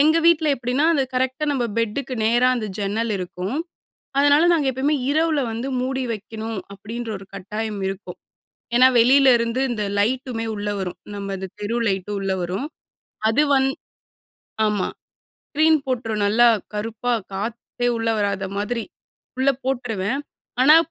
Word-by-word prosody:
எங்க 310 +3 +5
வீட்ல 335 -2 +5
எப்படின்னா, 250 +4 0
அது 280 - +3
கரெக்ட்டா 260 +3 0
நம்ம 260 -4 0
பெட்டுக்கு 230 +4 -1
நேரா 240 +3 +4
அந்த 225 -3 -3
ஜன்னல் 215 +3 -1
இருக்கும். 185 +6 -4 0.6
அதனால, 290 +2 +5
"நாங்க 315 -5 +2
எப்பவுமே 275 +4 +1 0.2
இரவில 315 0 +2
வந்து 235 +4 -3
மூடி 260 +1 -1
வைக்கணும்" 220 0 -5 0.2
அப்படின்ற 225 +4 -6
ஒரு 195 - -11
கட்டாயம் 210 +2 -4
இருக்கும். 195 +1 -7 0.6
ஏன்னா 255 +2 +8
வெளில 265 +3 +6
இருந்து 230 +2 -1
இந்த 215 -3 -2 0.2
லைட்டுமே 245 +1 0
உள்ள 205 0 -3
வரும். 180 -2 -4 0.2
நம்ம 200 -1 -4
இந்த 190 0 -5
தெரு 210 +3 -2
லைட்டு 195 0 -1
உள்ள 195 -1 -1
வரும். 185 +10 -3 0.6
அது 225 +7 +3
வந் 265 0 +3 1.0
ஆமா 210 -3 0 0.6
ஸ்கிரீன் 315 +2 +4
போட்டுருவேன். 225 -5 -1
நல்லா 230 +4 +5 0.3
கருப்பா 225 +3 -2 0.2
காத்தே 235 +4 -3
உள்ள 225 0 -1
வராத 200 -1 0
மாதிரி 225 +3 -2 0.5
உள்ள 260 +1 +3 0.2
போட்டுருவேன். 245 -3 -1 0.4
ஆனா, 300 +4 +8
230 Hz, 140 wpm, -22 LUFS, 205-265 Hz, 1.0 s, ஏன்னா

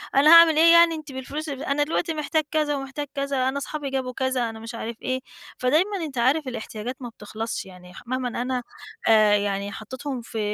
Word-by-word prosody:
أنا 285 +3 +6
هاعمل 335 -2 +8
إيه 335 +1 +7
يعني 335 -1 +6
أنتِ 310 -2 -8
بالفلوس 285 +4 -5
أنا 280 +1 -1
دلوقتي 325 +2 -1
محتاج 310 +1 0
كذا 300 -2 +1
ومحتاج 275 +1 -5
كذا، 275 -2 0
أنا 270 - -3
أصحابي 280 0 -4
جابوا 260 -1 -3
كذا، 260 -2 -1
أنا 225 0 -9
مش 225 +1 -8
عارف 230 0 -6
إيه، 260 0 -1 0.4
فدايمًا 325 +11 +2
أنت 275 -4 -8
عارف 265 +5 +2
الاحتياجات 235 0 -5
ما 245 - -5
بتخلصش، 220 0 -6
يعني 180 -1 -14
مهما 250 -1 -2
أنا 250 0 -2 0.5
آآ، 215 -2 +6
يعني 200 0 -1
حطيتهم 255 +5 -6
في 225 -1 -6
260 Hz, 190 wpm, -24 LUFS, 230-295 Hz, 0.5 s, هاعمل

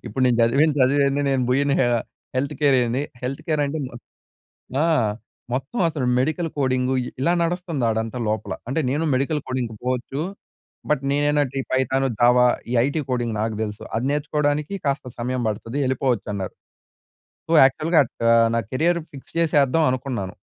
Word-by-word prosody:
ఇప్పుడు 130 - -2
నేను 120 -2 +3
చదివిన 140 +7 +4
చదువేంది? 140 +2 +3
నేను 130 -2 +1
పోయిన 140 +2 +2 0.2
ఆహ్, 120 -1 +2 0.4
హెల్త్ 140 +3 -1
కేర్ 140 -2 +5
ఏంది?" 120 +4 -1 0.2
హెల్త్ 135 +2 -3
కేర్ 155 -2 +1
అంటే 145 +3 -3 1.1
ఆ! - - +3 0.7
మొత్తం 135 - -3
అసలు 145 -5 -3
మెడికల్ 155 +5 0
కోడింగు 130 -1 +1
ఇ - - -5
ఇలా 170 +5 +3
నడుస్తంది 170 -5 -1
ఆడంతా 110 +2 -2
లోపల. 110 -1 -2 0.2
అంటే, 150 - 0
నేను 145 +5 0
మెడికల్ 140 +4 0
కోడింగ్‌‌కి 125 -3 -3
పోవచ్చు. 130 +3 -2 0.7
బట్, 150 -3 +2
నేనెందంటే, 145 -1 +1
ఈ - - -7
పైథాన్, 130 +1 +1
జావా 125 +1 +5 0.3
ఈ - - -1
ఐటీ 150 +3 -1
కోడింగ్ 120 -3 -1
నాకు 110 0 -1
తెలుసు. 105 -1 -6
అది 115 - -1
నేర్చుకోవడానికి 150 +2 0
కాస్త 140 0 0
సమయం 125 +1 -2
పడుతది 115 +4 -4
ఎళ్ళిపోవచ్చు 130 -4 0
అన్నారు. 95 -2 -4 1.0
సో, - - -1
యాక్చువల్‌‌గా 155 +5 +3
అట్ 115 - -12
ఆహ్, 115 0 +5
నా - - +2
కేరియర్ 170 +6 +1
ఫిక్స్ 135 - -12
చేసేద్దాం 155 -1 +3
అనుకున్నాను. 125 -7 -3
135 Hz, 160 wpm, -23 LUFS, 125-145 Hz, 1.1 s, కేర్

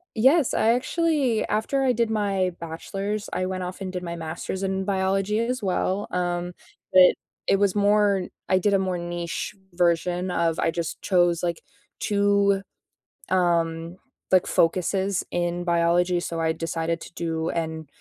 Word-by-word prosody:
Yes, 265 +5 +4
I 220 - +2
actually 275 -3 +1
after 270 +6 0
I 260 - +3
did 235 -1 +1
my 200 -4 0
Bachelor's, 195 +6 -4
I 185 - 0
went 185 0 -3
off 180 +2 -6
and 190 -1 -4
did 180 -1 -4
my 170 -1 -4
Master's 165 +3 -5
in 190 0 -1
biology 195 +1 0
as 250 +2 -1
well, 190 +1 -1
um, 175 0 -2 0.4
but 185 - +6
it 180 - +6 0.3
it 195 - +4
was 200 -1 +2
more, 205 -2 +3 0.2
I 185 - +4
did 205 +2 +1
a 195 - +4
more 185 -1 -1
niche 175 +3 -4 0.2
version 175 +1 +1
of 165 -2 0
I 165 - +2
just 165 -2 -4
chose 175 -3 +2
like 170 -1 -2 0.4
2, 200 -1 +2 0.7
um, 170 -2 +1 0.3
like, 185 -1 +4
focuses 190 +3 +1
in 175 0 -1
biology. 175 +1 +2
So, 165 -1 -4
I 160 0 +2
decided 165 0 -2
to - - -11
do 165 -1 -2
an 160 -1 -3
185 Hz, 160 wpm, -25 LUFS, 170-200 Hz, 0.7 s, but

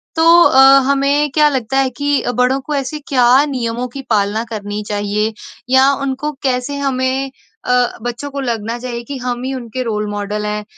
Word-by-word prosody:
तो 325 0 +2 0.2
अ, 265 - +4 0.3
हमें 280 +2 +2
क्या 300 +1 +4
लगता 260 -2 -2
है 270 -1 +2
कि 285 +3 -1
अ, - - -2
बड़ों 250 +2 +1
को 300 - -1
ऐसे 280 +2 -3
क्या 255 +1 +4
नियमों 245 -3 -3
की 275 - -5
पालना 210 +1 +1
करनी 205 0 -4
चाहिए 210 +1 -1 0.4
या 265 +1 +5
उनको 275 +2 -2
कैसे 260 +1 -1
हमें 265 -1 -1 0.4
अ, 250 -1 +1
बच्चों 240 +5 -5
को 280 - -5
लगना 230 -3 -3
चाहिए 240 -1 -5
कि 275 +3 -6
हम 245 -1 -4
ही 265 +1 -3
उनके 255 -1 -5
रोल 210 -2 -2
मॉडल 205 +1 -4
हैं 210 0 -3
250 Hz, 185 wpm, -16 LUFS, 225-275 Hz, 0.4 s, या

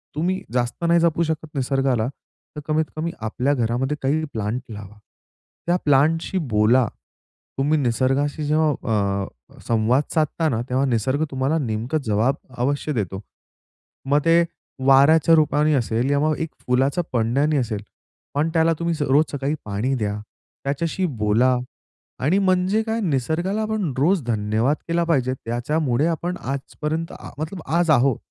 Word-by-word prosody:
तुम्ही 180 +5 -1
जास्त 125 +5 -1
नाही 170 0 +4
जपू 170 0 +2
शकत 160 -1 -3
निसर्गाला, 135 -3 +1 0.5
तर 150 - -5
कमीत-कमी 155 +1 -1
आपल्या 125 +6 0
घरामध्ये 125 +3 -1
काही 145 +4 +1
प्लांट 110 +2 -2
लावा. 105 0 -9 0.7
त्या 175 - +3
प्लांटशी 155 +6 +2
बोला. 110 +3 +4 0.7
तुम्ही 145 +3 +2
निसर्गाशी 135 +4 0
जेव्हा 155 +1 +2 0.5
अ, 65 -10 -11
संवाद 115 +4 +2
साधता 160 0 +1
ना, 115 -1 -1
तेव्हा 130 +2 +1
निसर्ग 130 +4 0
तुम्हाला 135 +4 0
नेमकं 120 +1 -1
जवाब 110 +5 +1 0.2
अवश्य 140 +4 -1
देतो. 95 -4 -3 0.9
मग 145 +1 +4
ते 170 +1 +5 0.4
वाऱ्याच्या 145 +4 +6
रूपाने 150 -1 +3
असेल 120 -1 0
किंवा 145 +2 +2
मग 155 - 0
एक 160 -1 -2 0.2
फुलाचं 135 +6 +2
पडण्याने 135 +6 +1
असेल 115 -6 -2 0.5
पण 150 +3 +1
त्याला 165 0 +3
तुम्ही 170 0 0
रोज 145 +4 +4
सकाळी 145 +1 -1
पाणी 105 +6 -1
द्या, 105 -4 -1 0.5
त्याच्याशी 165 +6 -1
बोला 110 +5 +3 0.6
आणि 155 +9 +2
म्हणजे 185 +2 +2
काय 225 +1 -2
निसर्गाला 175 - 0
आपण 215 -7 -1
रोज 165 +4 +2
धन्यवाद 110 +4 0
केला 170 0 +1
पाहिजे 135 -7 +1
त्याच्यामुळे 130 +3 -1
आपण 170 +2 -2
आजपर्यंत 150 +4 -4 0.2
मतलब 160 +4 -5
आज 170 +1 +1
आहोत. 135 -3 +4
140 Hz, 140 wpm, -22 LUFS, 120-160 Hz, 0.9 s, वाऱ्याच्या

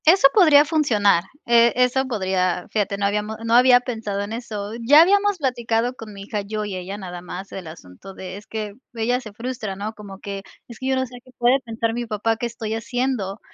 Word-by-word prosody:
Eso 330 -2 +7
podría 305 -7 +7
funcionar, 215 - +2 0.2
eh, 235 0 +5
eso 250 +1 +2
podría 185 -6 -1
fíjate, 205 -2 -1
no 200 - -1
habíamos 210 +2 -1
no 230 - 0
había 245 +1 +7
pensado 220 -5 -4
en 205 +2 -5
eso. 215 -3 -5
Ya 290 +7 +7
habíamos 405 +2 +3
platicado 245 -4 0
con 225 -3 -10
mi 200 -1 -9
hija, 205 +1 -3
yo 210 +1 -4
y 200 -2 -5
ella 185 +2 -5
nada 180 -3 -7
más, 180 +2 -8
el 185 -3 -7
asunto 160 - -12
de 185 0 -7
es 205 - -13
que 215 -2 -5 0.2
ella 245 +3 0
se 215 - -10
frustra, 225 -2 -5
¿no? 210 +3 -5
Como 200 -3 -10
que: 200 -1 -6 0.3
“Es 235 - -12
que 260 - -4
yo 265 - +2
no 260 0 0
sé 250 0 -11
qué - - -20
puede 245 +3 +4
pensar 230 -2 -3
mi 240 0 -3
papá, 220 +1 0
qué 240 - -2
estoy 225 -2 -5
haciendo”. 230 -3 -2
225 Hz, 215 wpm, -22 LUFS, 200-250 Hz, 0.3 s, Eso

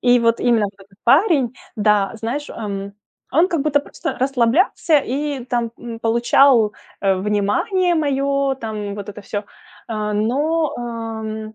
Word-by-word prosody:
И 245 0 +5
вот 230 0 +2
именно 230 -3 +3
вот 200 0 -5
этот 195 0 -26
парень, 275 - +4 0.2
да, 210 -2 +3
знаешь, 245 +7 -4
ам, 200 -2 -5 0.4
он 330 +6 +4
как 330 -6 0
будто 290 -1 +2
просто 320 +3 -5
расслаблялся 275 - +2
и 275 0 -3
там, 240 -2 -1
м, 230 -2 -8
получал, 235 0 +4 0.3
э, 195 -1 +3
внимание 210 - +1
мое 275 -2 +1
там, 215 -4 -5
вот 205 0 -7
это 205 0 -8
всё, 205 +1 -4 0.4
а, 210 -1 -2
но, 290 +9 0
ам, 220 -2 -5
235 Hz, 145 wpm, -20 LUFS, 215-280 Hz, 0.4 s, И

